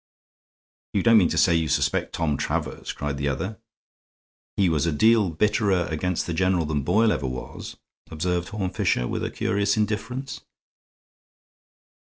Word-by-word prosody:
"You 100 - +2
don't 115 -2 +6
mean 90 - +3
to 85 - -2
say 85 - +4
you 80 -1 +1
suspect 70 - 0
Tom 80 -3 0
Travers?" - - -3
cried 70 -1 -4
the 70 +1 -2
other. 95 +11 -3 1.0
"He 100 - +3
was 80 -1 +1
a - - +2
deal 110 +5 +4
bitterer 100 +1 +1
against 90 +2 -1
the 85 - -3
general 90 -1 +1
than 75 -1 -1
Boyle 105 +9 +3
ever 70 - -1
was," 65 0 -7 0.3
observed 90 +2 -2
Horne 100 -3 -3
Fisher, - - 0
with - - -3
a - - -1
curious 100 +2 0
indifference. 115 +5 -3
90 Hz, 155 wpm, -24 LUFS, 80-105 Hz, 1.0 s, don't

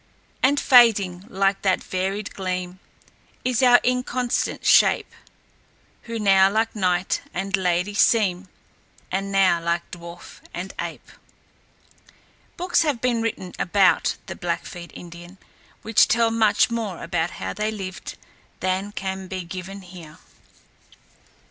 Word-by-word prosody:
"And 280 +2 +3
fading, 200 -8 +4
like 195 -1 0
that 190 -2 +1
varied 195 +2 -3
gleam, 185 -1 -4 0.7
Is 250 -1 +1
our 245 -1 +7
inconstant 250 -1 -1
shape, - - +4 0.9
Who 230 -1 -5
now 195 -2 +5
like 220 +3 0
knight 185 -2 0
and 195 +2 0
lady 180 +1 0
seem, 200 -3 +2 0.6
And 195 +1 -2
now 190 -3 +3
like 170 +1 -2
dwarf 170 0 -11
and 185 +2 -6
ape." - - -7 1.5
Books 360 +1 +1
have 295 -7 0
been 240 -1 0
written 205 -5 -4
about 190 +1 +2
the - - -7
Blackfeet 170 0 -5
Indians 175 +2 -11 0.5
which 225 0 +4
tell 230 -1 +2
much 220 0 +3
more 220 -6 -4
about 165 +1 -1
how - - -4
they 210 0 -2
lived 195 -3 -7 0.4
than 190 +2 -1
can 190 -1 -5
be 185 0 -5
given 185 +3 -8
here. 170 -3 -12
195 Hz, 125 wpm, -23 LUFS, 180-225 Hz, 1.5 s, our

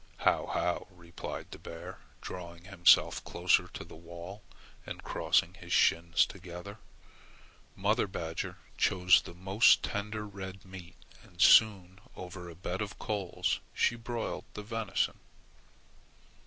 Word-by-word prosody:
"How, - - +2
how!" 90 0 -1
replied 85 -2 -8
the - - -9
bear, 85 +2 -9 0.2
drawing 85 -1 -8
himself 95 -2 +4
closer - - +2
to - - -8
the - - -13
wall 85 +5 -10 0.4
and - - -8
crossing 85 - +1
his 85 -1 -12
shins 85 0 +4
together. 95 +2 -9 1.0
Mother 105 +3 +1
badger 80 -3 -4 0.2
chose 90 -1 +5
the 85 - -11
most 95 +5 +4
tender 105 +1 -3
red 95 -1 -8
meat, 95 -2 -11 0.3
and 85 - -20
soon 95 -3 +6 0.2
over 90 -1 -8
a 85 - -10
bed 90 +2 -4
of 105 -1 -5
coals 100 -4 -1 0.2
she 120 - +2
broiled 115 0 -4
the 105 - -6
venison. 110 -1 -1
95 Hz, 130 wpm, -31 LUFS, 85-100 Hz, 1.0 s, soon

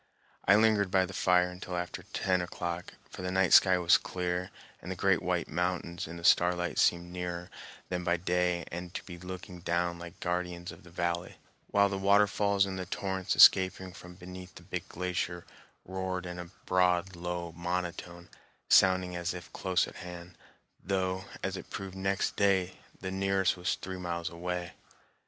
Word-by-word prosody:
I 100 - +7
lingered 105 -2 +4
by 95 0 +3
the 95 - -9
fire 90 -1 +3
until 90 0 -6
after 90 0 -4
ten 90 -2 +1
o'clock, 85 0 -5 0.2
for - - -8
the 90 - -2
night 95 -1 +2
sky 95 -1 +7
was 85 -1 +5
clear, 90 0 -3 0.3
and - - -6
the - - -3
great - - +2
white - - -1
mountains 90 +1 -2
in 85 +2 -8
the 85 - -10
starlight 90 +1 +3
seemed 85 0 +2
nearer 90 -1 -5 0.4
than 90 -1 -2
by 85 0 +2
day 90 -1 0
and 85 +1 -6
to - - -4
be 85 -2 -9
looking 90 0 -8
down 85 0 -1
like 85 +1 -10
guardians 90 0 -3
of - - -13
the 85 - -15
valley, 85 0 -2 0.3
while 100 0 +4
the 100 -1 -3
waterfalls, 100 0 +3
and 95 -1 -4
the 90 - -5
torrents 95 -1 -2
escaping 95 0 +6
from 90 -1 -12
beneath 90 0 -10
the 90 - -12
big 90 +1 -5
glacier, 90 -1 -3 0.4
roared 95 0 -3
in 90 0 -6
a 90 -1 -7 0.2
broad, 90 0 +2
low 85 0 -4
monotone, 85 0 -4 0.4
sounding 95 -1 +5
as 85 +1 -2
if 90 -1 -10
close 95 -1 +1
at - - -11
hand, 90 0 -9 0.5
though, 95 0 -1 0.2
as 95 0 -1
it 95 - -8
proved 95 -2 -6
next 95 0 0
day, 95 -2 +2 0.3
the 95 0 -4
nearest 95 0 +1
was 90 -1 -1
three 95 0 -7
miles 85 -1 -3
away. 90 0 -4
90 Hz, 175 wpm, -30 LUFS, 85-95 Hz, 0.5 s, I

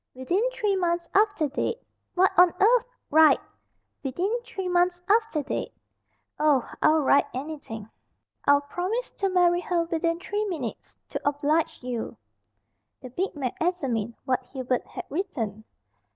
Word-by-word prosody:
"'Within 260 +10 0
three 425 -5 0
months 345 -2 0
after 405 -6 +3
date.'" 290 - -2 0.4
"What 375 +1 +4
on 355 0 +7
earth 470 +4 +5 0.2
" - - -50
"Write 315 +1 +7 0.6
'Within 350 - -1
three 430 -6 -5
months 355 0 +2
after 430 -7 +2
date.'" - - -4 0.6
"Oh, 295 -5 +3
I'll 315 0 +5
write 280 +1 +4
anything. 260 -7 -6 0.6
I'll 285 0 +5
promise 365 +11 -3
to 390 - -1
marry 355 -1 +3
her 350 -2 0
within 335 0 -1
three 415 +3 -2
minutes 310 - -5
to - - -4
oblige 290 +1 0
you." 245 -2 -4 0.8
The 255 - -10
big 365 +8 -2
man 265 -4 -2
examined 255 - -1
what 255 -1 +1
Hubert 255 -2 -2
had - - -7
written. 230 - -3
330 Hz, 140 wpm, -26 LUFS, 270-370 Hz, 0.8 s, on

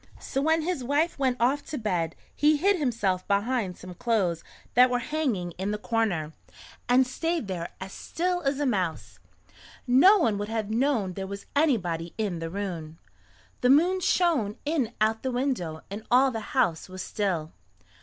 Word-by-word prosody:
So 270 - -2
when 320 +2 +2
his 340 -5 -2
wife 290 +5 0
went 260 -2 +1
off 265 +5 +2
to 300 - -4
bed 180 - -1 0.2
he 300 +1 +4
hid 390 +5 +3
himself 205 -9 0
behind 205 -1 0
some 185 0 -9
clothes 185 -5 0 0.3
that 250 +1 +6
were 245 - +1
hanging 245 - -2
in 195 +2 -1
the 210 - -1
corner, 210 -9 -1 0.6
and 255 +1 +5
stayed 325 - -2
there 175 -3 -4
as 190 +1 -7
still 355 +1 -2
as 275 -2 -1
a 290 - +1
mouse. 160 - -2 0.7
No 275 +12 +7
one 225 - +1
would 205 +1 -4
have 220 -2 -2
known 230 -6 +1
there 190 +1 -5
was 200 +1 -7
anybody 180 - +1
in 200 -6 -2
the 165 0 -4
room. 170 -5 -5 0.6
The 250 - +3
moon 345 +7 +5
shone 320 - +1
in 285 -7 0
at 220 +1 +2
the 260 - -2
window 245 - -2
and 205 +2 -5
all 260 +2 +5
the 225 - -3 0.2
house 170 -7 +1
was 185 0 -6
still. 180 -8 -2
225 Hz, 175 wpm, -27 LUFS, 185-280 Hz, 0.7 s, No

